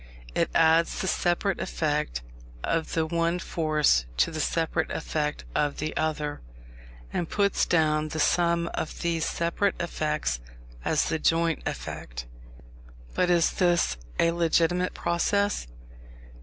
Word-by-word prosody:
It - - +1
adds 165 +1 +4
the - - -1
separate 180 +2 +1
effect 150 - -1 0.4
of 165 -1 -1
the 160 -1 +1
one 170 +1 0
force 155 - +2
to 165 - +3
the 160 - -4
separate 160 +1 0
effect 150 - -2
of 145 -1 0
the 155 +1 -3
other, 150 -2 -1 0.7
and 170 - -1
puts 200 -2 +2
down 155 -2 +2
the 155 +1 -4
sum 170 +2 +2
of - - -4
these 165 -2 0
separate 170 +4 0
effects 150 - -1 0.4
as - - +2
the 160 0 0
joint 165 0 +2
effect. - - -5 0.9
But 180 - +2
is 170 -1 +4
this 175 - +2 0.2
a 165 - +3
legitimate 170 +1 +1
process? 200 - 0
165 Hz, 130 wpm, -27 LUFS, 155-170 Hz, 0.9 s, adds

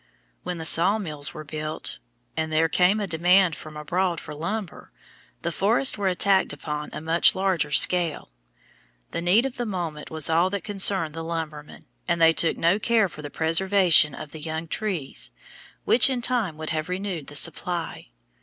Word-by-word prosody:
When 180 - -5
the 160 - -6
sawmills 165 -4 +1
were 155 - -7
built 155 - -6 0.4
and 160 0 -2
there 160 +1 +3
came 180 +5 +2
a 205 - -1
demand 175 +1 +3
from 155 0 -11
abroad 170 +3 -1
for - - -9
lumber, 190 +5 -5 0.5
the 170 - -1
forests 225 +10 +3
were 200 -2 -2
attacked 190 +1 +2
upon 150 +1 -5
a - - -6
much 160 +2 +3
larger 185 -5 0
scale. 165 - +3 0.8
The - - -3
need 190 +8 +3
of 265 -2 -5
the 240 - -2
moment 170 -6 -5
was 160 -2 -3
all 170 +3 +2
that 200 0 -4
concerned 195 -6 +1
the 165 - -6
lumbermen, 160 -3 -6 0.2
and 170 -1 0
they 165 0 +6
took 165 0 +1
no 170 +5 +2
care 220 -3 +2
for 155 -2 -11
the 145 - -7
preservation 165 -2 +3
of 145 - -9
the 160 - -10
young 160 +1 -4
trees, 170 - -3 0.6
which 245 +2 +5
in 250 -2 -2
time 225 -11 -1
would 155 0 -5
have 155 +2 -3
renewed 180 -5 -4
the 145 - -9
supply. 170 +2 -2
170 Hz, 175 wpm, -24 LUFS, 155-195 Hz, 0.8 s, they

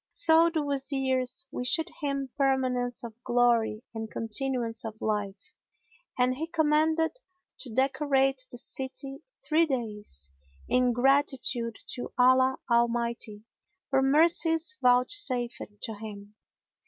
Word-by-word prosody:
So 330 -5 +5
the 315 -2 -1
Wazirs 265 -2 -1
wished 260 +7 +1
him 275 -2 -2
permanence 255 -3 0
of 235 -2 -7
glory 240 -2 +2
and 220 -1 -5
continuance 230 +1 -2
of 220 -1 -7
life, 210 -2 -3 0.6
and 250 0 +3
he 320 +5 -4
commanded 320 +5 +1 0.4
to 260 - -7
decorate 270 +1 +1
the 245 - -5
city 270 +2 -4 0.3
three 320 +2 +3
days, 210 - -4 0.4
in 250 0 +3
gratitude 255 -2 +1 0.2
to 245 - -6
Allah 260 +1 +4
Almighty 235 -3 0 0.5
for 270 0 +3
mercies 325 +4 +3
vouchsafed 250 0 +2 0.2
to 225 - -4
him. 205 -1 -9
255 Hz, 110 wpm, -28 LUFS, 235-280 Hz, 0.6 s, So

